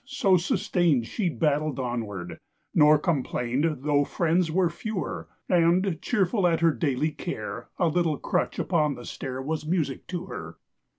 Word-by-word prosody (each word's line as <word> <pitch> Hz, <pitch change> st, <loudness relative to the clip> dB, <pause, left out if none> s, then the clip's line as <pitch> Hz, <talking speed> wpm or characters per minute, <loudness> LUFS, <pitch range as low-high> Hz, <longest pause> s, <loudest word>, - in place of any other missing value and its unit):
so 275 Hz, -9 st, +2 dB
sustain'd 170 Hz, -6 st, +1 dB
She 185 Hz, -, -1 dB
battled 150 Hz, -3 st, 0 dB
onward, 110 Hz, -8 st, -4 dB, 0.3 s
nor 150 Hz, 0 st, +6 dB
complain'd 140 Hz, -1 st, -1 dB
Though 145 Hz, -1 st, +3 dB
friends 170 Hz, +3 st, +1 dB
were 175 Hz, +1 st, +2 dB
fewer: 205 Hz, +2 st, -4 dB, 0.2 s
And, 175 Hz, 0 st, +2 dB
cheerful 195 Hz, -3 st, +1 dB
at 165 Hz, -1 st, +1 dB
her 165 Hz, -1 st, +5 dB
daily 150 Hz, 0 st, 0 dB
care, 165 Hz, +4 st, -6 dB
A 175 Hz, -, +2 dB
little 165 Hz, -2 st, +1 dB
crutch -, -, -1 dB
upon 155 Hz, -5 st, +1 dB
the 120 Hz, -, -10 dB
stair 130 Hz, 0 st, -5 dB
Was 155 Hz, +1 st, -3 dB
music 160 Hz, -6 st, -1 dB
to 180 Hz, 0 st, -4 dB
her. -, -, -8 dB
160 Hz, 145 wpm, -26 LUFS, 145-175 Hz, 0.3 s, nor